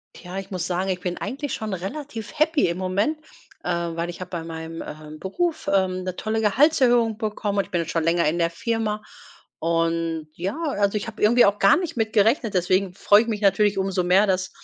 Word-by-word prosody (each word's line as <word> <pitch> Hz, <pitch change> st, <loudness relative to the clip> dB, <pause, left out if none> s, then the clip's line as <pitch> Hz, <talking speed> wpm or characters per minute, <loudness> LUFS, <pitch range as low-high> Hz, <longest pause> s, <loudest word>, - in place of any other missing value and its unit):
Tja, 180 Hz, +1 st, -7 dB
ich 195 Hz, 0 st, -7 dB
muss 180 Hz, -2 st, -3 dB
sagen 185 Hz, +2 st, -1 dB
ich 180 Hz, -1 st, -2 dB
bin 180 Hz, -1 st, -3 dB
eigentlich 285 Hz, +2 st, -4 dB
schon 215 Hz, -2 st, -4 dB
relativ 220 Hz, -, -6 dB
happy 305 Hz, -, +3 dB
im 170 Hz, -, -2 dB
Moment, 195 Hz, +11 st, 0 dB, 0.5 s
äh, -, -, -1 dB
weil 170 Hz, 0 st, -2 dB
ich 175 Hz, -, -10 dB
habe 185 Hz, -, -6 dB
bei 170 Hz, -3 st, -4 dB
meinem, 165 Hz, 0 st, -6 dB
ähm, 155 Hz, 0 st, -9 dB
Beruf, 320 Hz, -, -2 dB
ähm, 185 Hz, -1 st, +1 dB
'ne 185 Hz, -1 st, -3 dB
tolle 220 Hz, 0 st, -1 dB
Gehaltserhöhung 240 Hz, -1 st, +3 dB
bekommen. 210 Hz, -2 st, -2 dB
Und 200 Hz, -, +2 dB
ich -, -, -19 dB
bin 175 Hz, -3 st, 0 dB
jetzt 165 Hz, -, -4 dB
schon 165 Hz, -1 st, 0 dB
länger 165 Hz, -1 st, +2 dB
in 170 Hz, -, 0 dB
der 170 Hz, -1 st, +2 dB
Firma, 215 Hz, +3 st, -2 dB, 0.6 s
und, 165 Hz, -1 st, 0 dB
ja, 190 Hz, -, -4 dB
also 205 Hz, -9 st, 0 dB
ich 210 Hz, -, -7 dB
habe 220 Hz, -1 st, -8 dB
irgendwie 235 Hz, +4 st, +6 dB
auch 205 Hz, +1 st, +1 dB
gar 195 Hz, -, +6 dB
nicht 350 Hz, -7 st, -3 dB
mitgerechnet. 225 Hz, +1 st, +2 dB
Deswegen 185 Hz, 0 st, +1 dB
freue 205 Hz, +2 st, +5 dB
ich 235 Hz, -, -7 dB
mich 215 Hz, -2 st, -2 dB
natürlich 205 Hz, 0 st, +3 dB
umso 190 Hz, -1 st, 0 dB
mehr, 190 Hz, +4 st, +4 dB
dass 185 Hz, -1 st, 0 dB
195 Hz, 215 wpm, -23 LUFS, 175-220 Hz, 0.6 s, irgendwie